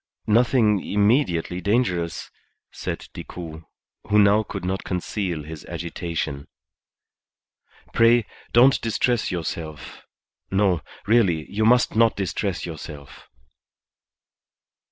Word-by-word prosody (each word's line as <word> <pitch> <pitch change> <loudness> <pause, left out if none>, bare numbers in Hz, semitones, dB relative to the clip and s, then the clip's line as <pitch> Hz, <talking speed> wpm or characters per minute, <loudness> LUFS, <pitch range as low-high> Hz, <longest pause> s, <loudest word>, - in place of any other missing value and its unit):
"Nothing 110 -2 +3
immediately 100 - +1
dangerous," 90 -5 -1 0.4
said - - -5
Decoud, 80 -2 -8 0.4
who 105 0 +3
now 105 +1 +5
could 100 -3 -6
not 95 +1 -2
conceal 90 -3 -3
his 80 0 -9
agitation. 85 -4 -4 1.5
"Pray 115 0 +5 0.3
don't 130 +3 +5
distress 115 0 0
yourself. 80 -4 -5 0.5
No, 95 -3 +2 0.2
really, 95 -8 +3
you 110 +2 0
must 125 +1 +4
not 115 0 +4
distress 95 -1 -2
yourself." 75 -4 -9
95 Hz, 95 wpm, -23 LUFS, 85-110 Hz, 1.5 s, now